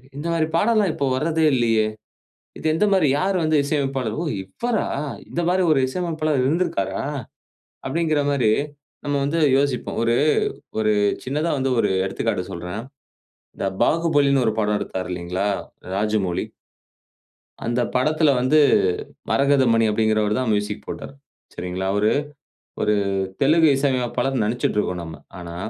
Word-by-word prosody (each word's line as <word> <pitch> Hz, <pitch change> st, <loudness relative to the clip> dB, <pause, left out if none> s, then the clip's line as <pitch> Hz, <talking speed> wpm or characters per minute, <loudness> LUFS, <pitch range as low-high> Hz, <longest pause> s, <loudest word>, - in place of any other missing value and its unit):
இந்தமாரி 165 Hz, +1 st, -1 dB
பாடல்லாம் 210 Hz, -1 st, +3 dB
இப்போத 140 Hz, -2 st, -1 dB
வர்றதே 160 Hz, +3 st, +1 dB
இல்லயே! 115 Hz, -3 st, +2 dB, 0.7 s
இது -, -, -11 dB
எந்தமாரி 190 Hz, -3 st, +3 dB
யார் 195 Hz, +1 st, 0 dB
வந்து 155 Hz, 0 st, +2 dB
இசையமைப்பாளர்? 135 Hz, -5 st, -1 dB
ஓ! -, -, -4 dB, 0.2 s
இவரா 225 Hz, -, -2 dB, 0.4 s
இந்தமாரி 180 Hz, +2 st, +1 dB
ஒரு 140 Hz, -, +4 dB
இசையமைப்பாளர் 155 Hz, -3 st, -1 dB
இருந்திருக்காரா?" 130 Hz, -, 0 dB, 0.8 s
அப்பிடிங்கிறமாரி 145 Hz, -6 st, +1 dB, 0.5 s
நம்ம 145 Hz, 0 st, 0 dB
வந்து 160 Hz, +4 st, 0 dB, 0.2 s
யோசிப்போம். 140 Hz, -2 st, -1 dB
ஒரு, 115 Hz, 0 st, +2 dB, 0.7 s
ஒரு 110 Hz, -1 st, +2 dB, 0.3 s
சின்னதா 150 Hz, +5 st, -1 dB
வந்து 135 Hz, 0 st, 0 dB
ஒரு -, -, +2 dB, 0.2 s
எடுத்துக்காட்டு -, -, -2 dB
சொல்றேன். 90 Hz, +5 st, -5 dB, 0.8 s
இந்த -, -, -2 dB, 0.2 s
பாகுபலின்னு 145 Hz, -5 st, +3 dB
ஒரு 110 Hz, -, +1 dB
படம் 105 Hz, 0 st, +1 dB
எடுத்தாரு 90 Hz, -1 st, -4 dB
இல்லேங்களா! 90 Hz, +3 st, -2 dB, 0.5 s
ராஜமௌலி. 105 Hz, -4 st, 0 dB, 1.2 s
அந்த 120 Hz, +1 st, 0 dB
படத்தில 155 Hz, +4 st, +3 dB
வந்து 150 Hz, +5 st, +4 dB, 0.7 s
மரகதமணி 130 Hz, -5 st, +3 dB
அப்பிடிங்கிறவருதான் 110 Hz, +2 st, +1 dB
மியூசிக் 105 Hz, 0 st, -2 dB
போட்டார். -, -, -7 dB, 0.4 s
சரிங்களா. 90 Hz, +1 st, -4 dB
அவரு 105 Hz, +1 st, +2 dB, 0.7 s
ஒரு 105 Hz, 0 st, +2 dB, 0.5 s
தெலுங்கு 160 Hz, +3 st, +5 dB
இசை 140 Hz, 0 st, +2 dB
அமைப்பாளர்னு 125 Hz, 0 st, -1 dB
நினச்சிட்டு 115 Hz, -1 st, -1 dB
இருக்கோம் 90 Hz, -3 st, -2 dB
நம்ம. 80 Hz, -1 st, -8 dB, 0.2 s
ஆனா, 85 Hz, -1 st, -8 dB
135 Hz, 120 wpm, -22 LUFS, 105-155 Hz, 1.2 s, தெலுங்கு